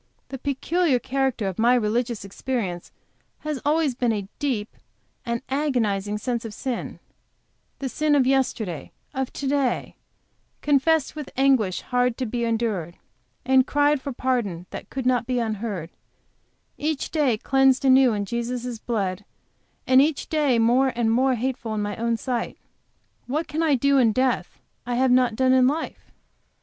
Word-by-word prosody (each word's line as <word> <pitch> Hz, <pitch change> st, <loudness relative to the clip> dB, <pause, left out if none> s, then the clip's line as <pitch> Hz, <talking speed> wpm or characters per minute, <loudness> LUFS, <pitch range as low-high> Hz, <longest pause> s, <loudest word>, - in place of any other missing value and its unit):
The 270 Hz, -, -6 dB
peculiar 285 Hz, +3 st, +1 dB
character 260 Hz, -4 st, -1 dB
of 190 Hz, 0 st, -4 dB
my 240 Hz, +2 st, +5 dB
religious 235 Hz, -1 st, -1 dB
experience 195 Hz, -4 st, -4 dB, 0.5 s
has 305 Hz, -3 st, -4 dB
always 300 Hz, -1 st, +2 dB
been 245 Hz, -1 st, 0 dB
a 205 Hz, -3 st, -3 dB
deep, 240 Hz, -7 st, -2 dB, 0.5 s
an 235 Hz, +1 st, -2 dB
agonizing 225 Hz, -8 st, 0 dB
sense 235 Hz, +1 st, -2 dB
of 220 Hz, -2 st, -7 dB
sin; 255 Hz, -3 st, -4 dB, 0.8 s
the 275 Hz, -, -4 dB
sin 295 Hz, +4 st, +1 dB
of 270 Hz, -3 st, +4 dB
yesterday, 240 Hz, -, -1 dB, 0.2 s
of 265 Hz, -2 st, -2 dB
to 280 Hz, -, -5 dB
day, 270 Hz, -3 st, 0 dB, 0.7 s
confessed 295 Hz, +1 st, +2 dB
with 300 Hz, -3 st, -6 dB
anguish 260 Hz, -9 st, +3 dB
hard 250 Hz, -1 st, 0 dB
to 260 Hz, -, -2 dB
be 235 Hz, +1 st, -2 dB
endured, 220 Hz, -7 st, -2 dB, 0.5 s
and 260 Hz, 0 st, +4 dB
cried 290 Hz, -1 st, +2 dB
for 280 Hz, -, -4 dB
pardon 240 Hz, -9 st, -1 dB
that -, -, -8 dB
could 265 Hz, -2 st, -4 dB
not 245 Hz, -2 st, +2 dB
be 255 Hz, -1 st, 0 dB
unheard; 215 Hz, -7 st, -3 dB, 0.9 s
each 305 Hz, -1 st, -2 dB
day 285 Hz, -8 st, +2 dB
cleansed 270 Hz, +3 st, +3 dB
anew 260 Hz, -1 st, +6 dB
in 205 Hz, -2 st, -2 dB
Jesus' 235 Hz, +2 st, -3 dB
blood, 205 Hz, -5 st, -2 dB, 0.6 s
and 260 Hz, +1 st, +6 dB
each 295 Hz, 0 st, 0 dB
day 295 Hz, -6 st, +2 dB
more 245 Hz, +4 st, +3 dB
and 230 Hz, -2 st, +1 dB
more 255 Hz, +2 st, +3 dB
hateful 240 Hz, -2 st, -3 dB
in 210 Hz, -, -1 dB
my 205 Hz, 0 st, -3 dB
own 230 Hz, 0 st, 0 dB
sight; 245 Hz, -1 st, -3 dB, 0.7 s
what 300 Hz, +6 st, -2 dB
can 310 Hz, +2 st, -2 dB
I 310 Hz, -4 st, +3 dB
do 280 Hz, +2 st, +3 dB
in 230 Hz, -4 st, +4 dB
death 255 Hz, +1 st, 0 dB, 0.3 s
I 245 Hz, -, -2 dB
have 260 Hz, +1 st, +3 dB
not 250 Hz, -2 st, +3 dB
done 260 Hz, +2 st, +3 dB
in 255 Hz, -1 st, +5 dB
life? 310 Hz, +4 st, -3 dB
250 Hz, 160 wpm, -24 LUFS, 225-270 Hz, 0.9 s, anew